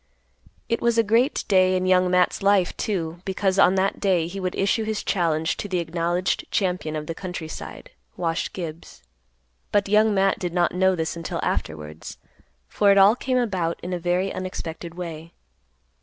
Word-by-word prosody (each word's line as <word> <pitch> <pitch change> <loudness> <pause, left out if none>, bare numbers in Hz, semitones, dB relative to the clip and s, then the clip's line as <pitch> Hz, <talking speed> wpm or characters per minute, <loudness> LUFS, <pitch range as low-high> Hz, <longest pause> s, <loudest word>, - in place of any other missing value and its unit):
It 230 - -1
was 235 -1 +2
a 230 - +5
great 230 +7 +2
day 185 -1 +4
in 185 - -1
Young 185 0 +3
Matt's 180 0 +2
life, 195 -2 +3
too, 170 -5 -3
because 190 0 0
on 190 -1 +5
that 195 +1 0
day 185 -5 +2
he 185 +4 -6
would 185 -1 -3
issue 200 +3 +1
his 215 -1 -3
challenge 165 -4 0
to - - -4
the 185 -2 -1
acknowledged 170 +2 -1
champion 180 -5 -1
of 150 -1 -4
the 165 - -4
country 175 -2 -6
side, - - -9 0.3
Wash 165 -1 -1
Gibbs. 165 - -8 0.7
But 205 -1 +2
Young 215 +2 +4
Matt 195 0 +2
did 175 -2 -3
not 175 -1 +2
know 190 +1 +3
this 160 -1 -2
until 165 -1 -4
afterwards, 75 0 -4 0.5
for 205 - +2
it 200 - +4
all 200 +3 +7
came 255 0 -1
about 185 -9 -1
in 180 +1 -4
a 180 - -2
very 180 +3 0
unexpected 170 -2 -6
way. 165 -2 -7
185 Hz, 180 wpm, -24 LUFS, 170-195 Hz, 0.7 s, all